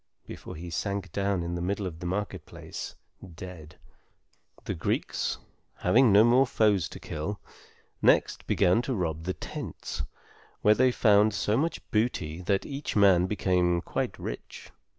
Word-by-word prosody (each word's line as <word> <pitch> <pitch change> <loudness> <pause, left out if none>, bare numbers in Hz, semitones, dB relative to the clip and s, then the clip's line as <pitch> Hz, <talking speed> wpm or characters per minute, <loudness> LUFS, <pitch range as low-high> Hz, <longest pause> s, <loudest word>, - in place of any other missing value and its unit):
before - - -9
he 85 +2 -7
sank 100 0 -3
down 100 -2 0
in 85 0 -3
the 85 - -3
middle 100 +3 -1
of 85 -3 -6
the 90 - -4
market 100 +2 -3
place, - - -8 0.4
dead. 80 -3 -9 0.9
The - - -2
Greeks, - - -1 0.4
having 115 +6 +4
no 105 +2 +7
more 125 +3 +5
foes 105 -8 +2
to - - -9
kill, 85 +7 -5 0.6
next - - +3
began 90 +6 +3
to 130 0 -2
rob 80 -4 -2
the 95 - -2
tents, - - -6 0.6
where 105 - +7
they 130 +4 +4
found 105 -3 +4
so 105 - +1
much 160 +7 -1
booty 90 -8 0
that 95 +2 0
each 140 +1 -5
man 95 -3 +5
became 90 -3 +1
quite - - -3
rich. - - -8
95 Hz, 150 wpm, -28 LUFS, 85-105 Hz, 0.9 s, no